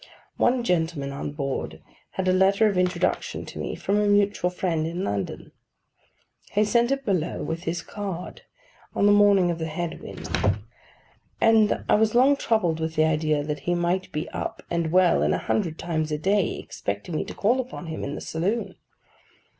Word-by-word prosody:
One 245 Hz, 0 st, +2 dB
gentleman 160 Hz, -8 st, 0 dB
on 140 Hz, +1 st, -5 dB
board 140 Hz, -2 st, -3 dB, 0.3 s
had 190 Hz, -1 st, -2 dB
a 185 Hz, -, +4 dB
letter 195 Hz, +3 st, +4 dB
of 210 Hz, -2 st, +2 dB
introduction 180 Hz, -1 st, 0 dB
to -, -, -9 dB
me -, -, -3 dB
from 205 Hz, +1 st, 0 dB
a 210 Hz, -, +2 dB
mutual 205 Hz, -2 st, +2 dB
friend 170 Hz, -3 st, -1 dB
in 175 Hz, +3 st, -3 dB
London. 100 Hz, -, -3 dB, 1.0 s
He 210 Hz, +1 st, +3 dB
sent 235 Hz, +3 st, +2 dB
it 275 Hz, 0 st, -1 dB
below 180 Hz, -5 st, -1 dB
with 165 Hz, +3 st, -4 dB
his 165 Hz, 0 st, -2 dB
card, 195 Hz, -4 st, -6 dB, 0.5 s
on -, -, +2 dB
the 205 Hz, -, +6 dB
morning 200 Hz, -3 st, +5 dB
of 170 Hz, -, -4 dB
the 160 Hz, -, -2 dB
head 165 Hz, +1 st, -4 dB
wind; -, -, -8 dB, 1.1 s
and 220 Hz, -2 st, +4 dB
I -, -, +3 dB
was 215 Hz, +1 st, +3 dB
long 265 Hz, +4 st, +6 dB
troubled 210 Hz, -, +1 dB
with 160 Hz, 0 st, -3 dB
the 155 Hz, 0 st, +4 dB
idea 155 Hz, -1 st, +1 dB
that 150 Hz, 0 st, -3 dB
he 175 Hz, -, +3 dB
might 175 Hz, +2 st, -1 dB
be 150 Hz, -, -3 dB
up, -, -, -5 dB
and 170 Hz, -2 st, 0 dB
well, 180 Hz, 0 st, +4 dB
and -, -, +2 dB
a -, -, 0 dB
hundred 170 Hz, -7 st, -1 dB
times 155 Hz, -2 st, -2 dB
a 150 Hz, -, 0 dB
day 195 Hz, +4 st, +1 dB
expecting 100 Hz, -, -5 dB
me -, -, 0 dB
to -, -, -8 dB
call 235 Hz, +6 st, +2 dB
upon 255 Hz, -8 st, -5 dB
him 160 Hz, -1 st, -5 dB
in 140 Hz, -, -4 dB
the -, -, -6 dB
saloon. 195 Hz, +9 st, -2 dB
180 Hz, 185 wpm, -25 LUFS, 160-205 Hz, 1.1 s, the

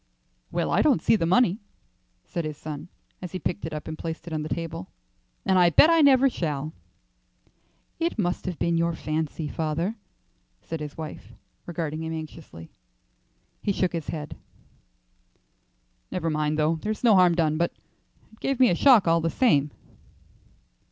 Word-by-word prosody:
"Well, -, -, -1 dB
I -, -, +3 dB
don't -, -, +4 dB
see 190 Hz, -, +3 dB
the 165 Hz, -6 st, 0 dB
money," 195 Hz, +1 st, +3 dB, 0.7 s
said 170 Hz, -, -4 dB
his 155 Hz, -2 st, -5 dB
son 155 Hz, +1 st, -7 dB, 0.3 s
as 180 Hz, -2 st, -7 dB
he -, -, -2 dB
picked 180 Hz, 0 st, -3 dB
it -, -, -7 dB
up 150 Hz, -1 st, -6 dB
and 160 Hz, -, -4 dB
placed 165 Hz, +1 st, -6 dB
it 170 Hz, -, -7 dB
on 155 Hz, -, -1 dB
the 155 Hz, -, -5 dB
table, 165 Hz, -, -4 dB, 0.6 s
"and 190 Hz, -1 st, +4 dB
I 175 Hz, -1 st, +6 dB
bet 305 Hz, -, +6 dB
I 330 Hz, -1 st, +5 dB
never 275 Hz, -2 st, +6 dB
shall." 155 Hz, -, -3 dB, 1.3 s
"It 335 Hz, -3 st, -1 dB
must 180 Hz, -3 st, -1 dB
have 180 Hz, -3 st, -3 dB
been 170 Hz, -1 st, +1 dB
your 170 Hz, 0 st, +1 dB
fancy, 155 Hz, 0 st, -3 dB
father," 165 Hz, +8 st, -2 dB, 0.6 s
said 165 Hz, -, -6 dB
his 150 Hz, -1 st, -7 dB
wife, 155 Hz, -1 st, -8 dB, 0.3 s
regarding 160 Hz, -2 st, -3 dB
him 160 Hz, 0 st, -4 dB
anxiously. 155 Hz, -, -9 dB, 0.9 s
He 205 Hz, -, 0 dB
shook 185 Hz, -2 st, 0 dB
his 165 Hz, -3 st, -4 dB
head. 150 Hz, -2 st, -5 dB, 1.7 s
"Never 165 Hz, -3 st, -2 dB
mind, 150 Hz, 0 st, 0 dB
though; 155 Hz, +1 st, +2 dB
there's 215 Hz, +7 st, -4 dB
no 230 Hz, -3 st, +6 dB
harm 180 Hz, -3 st, +5 dB
done, 155 Hz, -2 st, +1 dB
but 170 Hz, +1 st, +1 dB, 0.6 s
it 220 Hz, -, -20 dB
gave 275 Hz, -2 st, -1 dB
me 255 Hz, -, +6 dB
a -, -, +3 dB
shock 235 Hz, -4 st, +6 dB
all 165 Hz, 0 st, +4 dB
the 165 Hz, -, 0 dB
same." 150 Hz, -, +3 dB
165 Hz, 170 wpm, -26 LUFS, 155-185 Hz, 1.7 s, I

